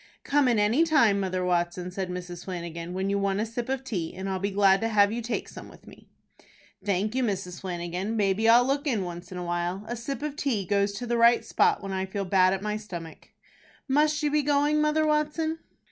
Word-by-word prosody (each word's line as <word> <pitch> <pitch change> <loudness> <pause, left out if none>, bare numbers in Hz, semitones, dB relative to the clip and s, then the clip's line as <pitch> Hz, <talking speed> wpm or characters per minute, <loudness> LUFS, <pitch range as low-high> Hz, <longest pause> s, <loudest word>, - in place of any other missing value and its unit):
"Come 285 -1 +2
in 240 -3 +3
any 215 +9 +3
time, 235 -11 +4
Mother 185 -1 -1
Watson," 175 0 -1
said 185 0 -4
Mrs. 180 -1 -7
Flanagan, 170 -1 -6
"when 190 +1 -1
you 200 - +1
want 195 0 0
a 215 - 0
sip 230 +2 -5
of 265 0 -2
tea, 185 -11 -4
and 190 +1 -5
I'll 190 -1 -2
be 200 +2 -1
glad 195 0 +4
to 225 - +1
have 205 -2 +4
you 235 +2 -3
take 235 +1 -3
some - - -10
with - - -17
me." - - -16 0.8
"Thank 200 +2 0
you, 260 0 0
Mrs. 190 -5 -3
Flanagan; 180 +3 -3
maybe 205 +2 +2
I'll 240 +2 +7
look 280 +3 -1
in 225 -8 0
once 175 0 -8
in 185 - -6
a 180 - -4
while. 175 +3 -2
A 240 - -3
sip 270 +5 -5
of 300 -1 -3
tea 240 -10 -1
goes 200 +1 +1
to 210 +5 -5
the 240 0 0
right 235 +1 +5
spot - - +2
when 195 - -5
I 190 0 -2
feel 195 +1 -3
bad 185 0 +4
at 195 0 -2
my 210 0 -1
stomach." 175 -6 -9 0.6
"Must 300 +2 +2
you 295 - +1
be 300 0 +3
goin', 290 +1 +2
Mother 305 +1 +2
Watson?" 305 +1 0
200 Hz, 230 wpm, -27 LUFS, 185-250 Hz, 0.8 s, I'll